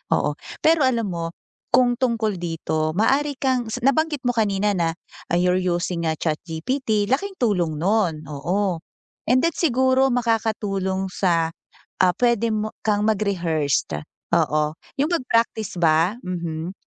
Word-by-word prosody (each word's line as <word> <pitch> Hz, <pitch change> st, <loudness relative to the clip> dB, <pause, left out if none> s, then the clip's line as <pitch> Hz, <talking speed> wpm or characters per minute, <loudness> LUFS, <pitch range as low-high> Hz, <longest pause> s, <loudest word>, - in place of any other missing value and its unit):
oo. -, -, 0 dB, 0.3 s
Pero 320 Hz, -1 st, +4 dB
alam 230 Hz, -4 st, +1 dB
mo, 170 Hz, -1 st, -3 dB, 0.5 s
kung 250 Hz, 0 st, +4 dB
tungkol 230 Hz, -5 st, 0 dB
dito, 160 Hz, -2 st, -1 dB
maaari 275 Hz, +5 st, +2 dB
kang 255 Hz, -4 st, 0 dB, 0.2 s
nabanggit 295 Hz, 0 st, +1 dB
mo 245 Hz, -, +2 dB
kanina 205 Hz, -1 st, +1 dB
na, 165 Hz, -2 st, +1 dB, 0.4 s
ah, 175 Hz, -, +3 dB
you're 180 Hz, +1 st, +2 dB
using 175 Hz, -1 st, -1 dB
a 160 Hz, -, -1 dB
ChatGPT, 205 Hz, -, -1 dB
laking 385 Hz, +10 st, -1 dB
tulong 180 Hz, -10 st, +1 dB
nun, 175 Hz, -5 st, +1 dB
oo. 170 Hz, +5 st, -1 dB, 0.5 s
And 255 Hz, -, +5 dB
then, 335 Hz, -, +1 dB
siguro 260 Hz, -3 st, +3 dB
makakatulong 210 Hz, -5 st, 0 dB
sa, 165 Hz, -3 st, +1 dB, 0.5 s
ah, 180 Hz, -1 st, +4 dB
puwede 235 Hz, -2 st, +2 dB
mo 215 Hz, 0 st, -2 dB
kang 210 Hz, -1 st, +2 dB
mag-rehearsed, 170 Hz, -, 0 dB, 0.3 s
oo. 150 Hz, 0 st, +1 dB, 0.3 s
'Yung 300 Hz, +5 st, +1 dB
mag-praktis 230 Hz, -, 0 dB
ba, 165 Hz, +6 st, +3 dB
mhm, 170 Hz, -1 st, -4 dB
205 Hz, 130 wpm, -23 LUFS, 170-245 Hz, 0.5 s, And